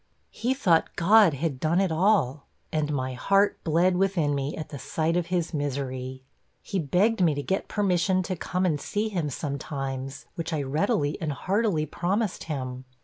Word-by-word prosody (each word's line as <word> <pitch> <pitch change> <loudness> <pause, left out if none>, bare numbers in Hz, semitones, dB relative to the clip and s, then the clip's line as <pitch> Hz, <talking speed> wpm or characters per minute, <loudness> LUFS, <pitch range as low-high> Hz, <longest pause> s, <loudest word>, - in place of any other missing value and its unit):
He 250 +3 -1
thought 175 -11 +2
God 195 -2 +5
had 140 -2 -2
done 160 +5 +2
it 195 -3 +1
all 160 - +2 0.2
and 150 -1 0
my 130 -2 -2
heart 195 +10 +2
bled 175 +3 +3
within 180 -6 +1
me 140 +1 -2
at 155 - -6
the 140 - -7
sight 160 +4 -1
of 175 -1 0
his 175 -1 -1
misery. 130 -3 -3 0.4
He 195 - -2
begged 190 +8 +2
me 160 -5 +4
to 145 - -3
get 190 +5 -1
permission 185 -2 +1
to 185 - -3
come 180 +2 -1
and 150 -5 0
see 215 +1 -1
him 175 -7 -2
sometimes, 135 -1 -4
which 165 -2 -4
I 150 -2 0
readily 150 - 0
and 155 -2 -1
heartily 185 - 0
promised 195 +6 -1
him.' 130 -4 -4
165 Hz, 175 wpm, -26 LUFS, 140-190 Hz, 0.4 s, God